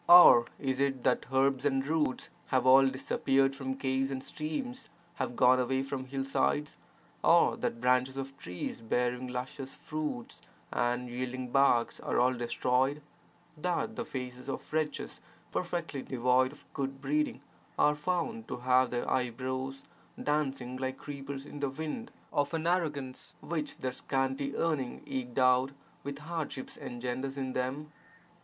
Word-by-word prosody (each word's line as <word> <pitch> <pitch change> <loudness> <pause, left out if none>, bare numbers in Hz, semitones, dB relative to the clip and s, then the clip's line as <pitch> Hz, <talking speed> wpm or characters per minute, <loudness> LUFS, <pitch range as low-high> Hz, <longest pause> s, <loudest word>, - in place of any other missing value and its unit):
Or 175 -9 +10
is 135 -2 -1
it 135 -2 +1
that - - +2
herbs 135 0 +3
and 135 -2 +1
roots 150 -3 0 0.2
have 130 -1 +2
all 135 +1 +8
disappeared 135 +1 +2
from 135 -1 -3
caves, 135 0 0
and 135 -1 -4
streams 245 - -4 0.3
have 130 -2 -2
gone 130 +1 +6
away 130 +1 +1
from 135 -1 -4
hillsides, 135 +2 0 0.5
or - - +6
that 115 - -2
branches 125 +2 +2
of 135 0 -5
trees 90 +5 -5
bearing 125 +2 0
luscious 130 +2 -5
fruits 150 -6 -4 0.3
and 120 +1 0
yielding 125 +1 -4
barks 135 -4 +4
are - - 0
all 125 +1 +4
destroyed, 125 +3 +1 0.6
that 180 +7 -1
the 235 - -2
faces 125 - -6
of 135 - -5
wretches, 155 -2 -2 0.3
perfectly 170 -6 -2
devoid 125 +1 +2
of 145 - -16
good 135 -1 -3
breeding, 150 +2 0 0.4
are 150 - +5
found 150 -7 -2
to - - -4
have 130 +1 +4
their 120 -1 -2
eyebrows 130 +2 -2 0.4
dancing 135 -4 -1
like 130 0 -2
creepers 140 -1 -6
in 145 - -8
the 140 -1 0
wind 160 - -5 0.2
of 145 +3 +1
an 160 0 -2
arrogance 150 -7 -1
which 155 -2 -3
their 130 - -2
scanty 135 +2 -1
earning 150 -7 -1
eked 125 -2 -4
out 130 +1 +4 0.3
with 140 0 -4
hardship 150 -3 -4
engenders 125 +3 -4
in 130 -1 -2
them? 135 +4 -2
135 Hz, 145 wpm, -31 LUFS, 130-145 Hz, 0.6 s, Or